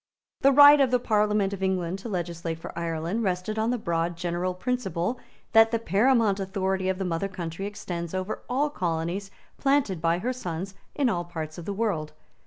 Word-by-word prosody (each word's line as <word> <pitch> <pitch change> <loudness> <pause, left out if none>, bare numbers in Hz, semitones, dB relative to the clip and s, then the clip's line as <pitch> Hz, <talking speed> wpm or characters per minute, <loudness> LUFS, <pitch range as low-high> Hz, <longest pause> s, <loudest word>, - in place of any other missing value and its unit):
The 275 - +5
right 285 +1 +9
of 265 - +4
the 250 - +3
Parliament 210 -3 +1
of 195 - -6
England 190 -1 -1
to 230 - -7
legislate 170 -3 -3
for 165 - -9
Ireland 170 +5 -2
rested 190 +2 -1
on 220 +1 +1
the 250 - +1
broad 170 -4 -1
general 175 +1 -2
principle 230 -1 -2 0.3
that 225 0 +7
the 230 - +1
paramount 220 0 +2
authority 190 -1 -1
of 190 - 0
the 190 - -2
mother 175 +2 -1
country 185 0 -5
extends 180 -4 -5
over 185 +3 -3
all 285 +4 +1
colonies 175 - -2 0.3
planted 270 - +1
by 165 +1 +2
her 245 +8 -2
sons 185 -5 -5 0.2
in 285 -3 +2
all 175 -7 0
parts 160 -2 -6
of 170 - -8
the 200 - -3
world. 190 -8 -1
190 Hz, 190 wpm, -26 LUFS, 170-225 Hz, 0.3 s, right